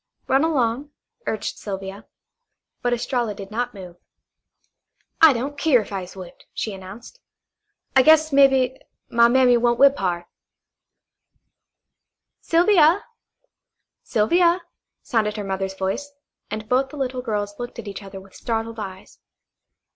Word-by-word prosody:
Run 270 +3 +3
along," 275 -3 0 0.4
urged 215 - -3
Sylvia. 195 0 -7 0.7
But 245 - 0
Estralla 240 -2 -1
did 195 0 -9
not 245 +1 -3
move. 180 -3 -10 1.2
"I 320 -2 +9
don't 275 +3 -4
keer 295 -7 +4
if 210 - -10
I 195 - -2
is 180 +1 -10
whipped," 185 -2 -12
she 215 - -3
announced. 195 - -11 0.8
"I 265 - +8
guess, 315 +1 +5
mebbe, 265 -2 +4 0.3
my 235 0 +5
mammy 250 0 +4
won't 240 0 +2
whip 275 +2 +6
hard." 175 -2 -1 2.1
"Sylvia, 345 +1 +4 1.0
Sylvia," 340 +11 +2 0.4
sounded 220 -5 0
her 210 - -3
mother's 190 0 -3
voice, 195 +10 -3 0.4
and 215 0 -5
both 260 +3 +1
the 295 - -10
little 255 -2 -2
girls 205 -4 -3
looked 240 0 -6
at - - -8
each 200 0 -6
other 195 -1 -9
with 190 0 -17
startled 225 -1 -4
eyes. 190 -2 -9
235 Hz, 130 wpm, -22 LUFS, 200-275 Hz, 2.1 s, I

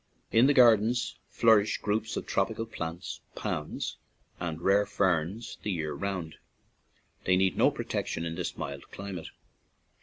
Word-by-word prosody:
In 115 +4 +6
the 145 - +5
gardens 120 -1 +4 0.2
nourish 110 -2 +5
groups 110 +1 -1
of - - -3
tropical 115 0 0
plants, 85 -4 -6
palms, - - -3 0.4
and 80 -2 -3
rare 100 +4 +3
ferns 95 +4 0
the - - -3
year 80 -4 -2
round; 95 -5 -4 0.9
they 95 - +4
need 95 0 +2
no - - +5
protection 85 - -3
in 85 - -3
this 85 0 -4
mild 70 0 -6
climate. 95 -4 -6
95 Hz, 140 wpm, -29 LUFS, 85-110 Hz, 0.9 s, In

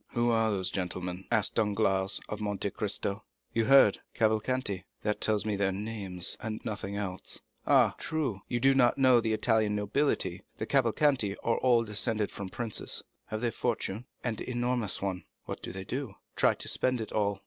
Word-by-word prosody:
"Who 120 0 +2
are 115 -1 +3
those 95 -3 0
gentlemen?" 90 0 -3
asked 105 -3 +2
Danglars 100 -3 +1
of 105 0 -5
Monte 100 -1 -1
Cristo. 100 0 -2 0.3
"You 115 -1 +2
heard—Cavalcanti." 110 -4 +3 0.2
"That 105 -1 -1
tells 105 -1 +2
me 105 -1 0
their 100 -1 +1
name, 100 -2 -5 0.2
and 110 -1 -4
nothing 100 -3 -4
else." 95 -3 -3 0.3
"Ah! - - +5
true. 140 -11 -2
You 120 - -1
do 135 +2 +5
not 125 -3 +4
know 130 -3 +6
the 110 -1 0
Italian 110 -2 +2
nobility; 105 -4 0 0.2
the 110 - -2
Cavalcanti 125 -3 +2
are 115 - +1
all 120 -2 +4
descended 105 0 0
from 100 -2 -6
princes." 115 +1 -3 0.2
"Have 110 0 -4
they 120 - +2
any - - -5
fortune?" 115 -1 -2 0.2
"An 115 -4 -2
enormous 120 -5 -1
one." 95 -2 -2 0.2
"What - - -6
do - - -5
they 95 +1 -5
do?" 130 -4 -4 0.2
"Try - - +4
to - - -5
spend 130 -1 +1
it 110 - -5
all. 100 -2 0
110 Hz, 175 wpm, -30 LUFS, 100-120 Hz, 0.3 s, know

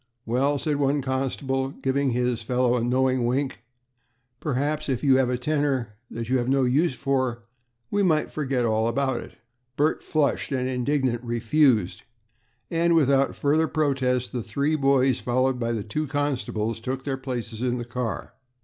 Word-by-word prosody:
"Well," 135 +5 +1
said 145 +2 -1
one 140 0 +1
constable, 135 0 -1
giving 135 0 -1
his 125 -1 0
fellow 125 +1 +1
a 120 - 0
knowing 130 +1 +2
wink, 135 +1 -1 0.8
"perhaps 150 +2 -1
if 130 0 -1
you 135 -2 +5
have 130 -2 +2
a 125 - 0
'tenner' 135 -4 0 0.2
that 115 0 -5
you 130 +1 +2
have 120 +1 -1
no 135 0 +3
use 135 +4 +2
for, 130 -3 -1 0.5
we 205 - +2
might 160 -5 +2
forget 135 -5 -1
all 110 0 +1
about 135 +3 0
it." - - -11 0.4
Bert, 150 +3 +1
flushed 150 -2 0
and 130 -2 0
indignant, 130 -1 0
refused, 120 - +2 0.7
and 170 0 +3
without 140 -3 +3
further 155 +3 +2
protest, 130 -5 0
the 125 - -3
three 140 +8 0
boys, 135 -3 +3
followed 130 +1 +1
by 115 -1 -1
the 110 -3 -2
two 150 +9 -3
constables, 130 -6 -2
took 130 +3 -4
their 135 -1 -2
places 120 -4 -5
in 125 -1 0
the 120 - -4
car. 120 -1 -4
130 Hz, 165 wpm, -25 LUFS, 125-140 Hz, 0.8 s, you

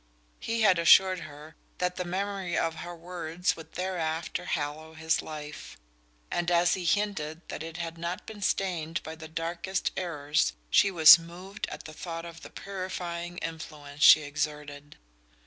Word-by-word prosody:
He 230 0 -2
had 190 -5 +5
assured 185 +2 +6
her 150 +1 -11 0.2
that 180 0 -1
the 180 - -1
memory 190 0 -2
of 165 -1 0
her 175 0 -7
words 175 0 -2
would 160 -1 -12
thereafter 170 -2 -3
hallow 155 +1 -3
his 160 0 +1
life; 150 -1 -8 0.5
and 175 0 0
as 175 0 +4
he 185 -2 -3
hinted 165 -4 -1
that - - -5
it 165 +1 -7
had 165 -1 -5 0.3
been 215 -2 -9
stained 175 -4 -1
by 160 - -6
the 160 0 -10
darkest 170 +4 -2
errors 150 -4 0 0.2
she 210 -1 +5
was 170 -2 +9
moved 180 +5 -7
at - - -8
the 155 - -9
thought 165 +1 -6
of 165 -1 -10
the - - -10
purifying 175 -3 -5
influence 150 -3 -7
she 155 - +9
exerted. 145 0 -5
170 Hz, 155 wpm, -28 LUFS, 155-180 Hz, 0.5 s, was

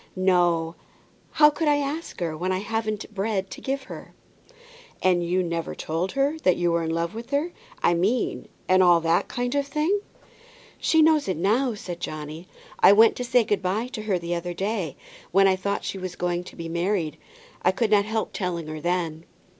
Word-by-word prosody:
"No; 175 -3 +2 0.6
how 300 0 +6
could 310 +1 -2
I 295 -1 +4
ask 290 - -4
her, 165 -2 -1
when 180 +4 -2
I 185 - +1
hadn't 215 +1 -3
bread 195 -1 -2
to - - -8
give 270 0 -2
her?" - - -10 0.9
"And 180 -2 +3
you 180 +2 +1
never 170 -1 -3
told 165 +4 -3
her 275 +3 +1
that 185 - +3
you 175 -1 +1
were 170 0 +1
in 165 - -2
love 165 +3 -1
with 230 +2 -8
her, 295 +5 0 0.3
I 175 - +4
mean, 200 +8 0 0.2
and 185 0 +5
all 175 -2 +6
that 165 +1 +2
kind 245 0 -2
of 285 -1 0
thing." 310 +8 +1 0.8
"She 320 -1 +4
knows 310 -4 +4
it 185 - -1
now," 225 +7 +1
said 175 -4 -7
Johnny; 155 +3 -6 0.3
"I 195 - +8
went 220 +2 +6
to 250 - -2
say 245 0 +3
good 205 -2 0
by 205 +6 -1
to 245 -4 -6
her 210 -3 0
the 170 0 -4
other 175 0 -3
day, 195 -5 -2 0.3
when 195 +2 +5
I 190 - +4
thought 200 +2 -2
she 195 - -4
was 185 -1 -5
going 175 0 -2
to - - -11
be 165 -1 -6
married. 170 -2 -1 0.4
I 180 - +3
could 215 +3 -1
not 205 -1 +5
help 220 0 -2
telling 175 -4 -3
her 155 0 -6
then." 170 -2 -2
190 Hz, 200 wpm, -25 LUFS, 170-230 Hz, 0.9 s, I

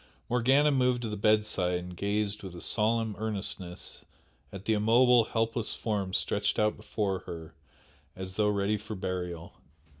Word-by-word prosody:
Morgana 135 +5 +4
moved 125 -2 +2
to 115 - -2
the 105 - -3
bedside 105 -4 +2
and 90 0 -7
gazed 105 +2 -1
with 95 -3 -8
a - - -7
solemn 110 0 +1
earnestness 100 -4 -4 0.5
at 100 +1 -9
the 110 - +2
immobile, 115 +2 +5
helpless 115 0 -1
form 100 -4 -2
stretched 105 0 0
out 105 0 +2
before 100 -3 -2
her 80 -1 -7 0.6
as 95 0 -6
though 105 0 +3
ready 105 +1 +1
for 105 +1 -7
burial. 90 -3 -4
105 Hz, 150 wpm, -29 LUFS, 95-115 Hz, 0.6 s, immobile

